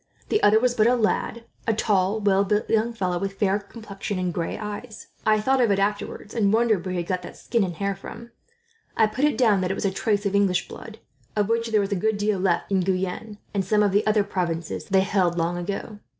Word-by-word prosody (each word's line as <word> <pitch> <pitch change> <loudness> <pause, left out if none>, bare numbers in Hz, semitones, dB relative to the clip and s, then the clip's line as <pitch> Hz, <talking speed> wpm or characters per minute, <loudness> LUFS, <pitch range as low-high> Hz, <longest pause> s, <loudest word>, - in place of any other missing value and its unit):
The 425 - +2
other 215 +1 +5
was 250 +1 +2
but 220 -2 +3
a 245 - +4
lad 235 0 -1 0.2
a 225 - +2
tall, 205 -1 +1
well 200 -1 +3
built 210 +2 0
young 225 +1 +1
fellow, 185 -6 -2
with 195 +1 -3
fair 200 -1 +2
complexion 205 -1 -7
and 180 -1 -1
gray 165 0 -3
eyes. 210 +2 -7 0.2
I 215 0 +4
thought 260 +4 +2
of 235 - +3
it 200 - +2
afterwards, 205 +1 -2
and 205 -4 +2
wondered 220 -5 +2
where 185 -1 -3
he 175 - -1
got 180 +1 -2
that - - -10
skin 235 -3 0
and 175 -3 -3
hair 200 +2 -2
from. 235 +4 -10 0.7
I 220 - +6
put 215 +7 0
it 300 - +1
down 215 -6 +3
that 180 - -1
it 195 - -1
was - - -3
a 195 - +2
trace 205 +1 0
of 200 - 0
English 200 -3 +2
blood, - - -10 0.4
of 210 0 +1
which 230 0 +1
there 215 -2 +2
is 195 - -4
a - - +2
good 215 +3 0
deal 205 0 0
still 185 - -2
left 175 +1 0
in 195 - +3
Guyenne, 190 +3 -2 0.2
and 200 -2 0
some 210 +3 +2
of 205 - +2
the 205 +2 +3
other 210 -1 +3
provinces 170 -5 -3
they 190 -1 +3
held, 190 -3 +1
long 170 +1 0
ago." 200 +4 -5
205 Hz, 245 wpm, -24 LUFS, 190-220 Hz, 0.7 s, I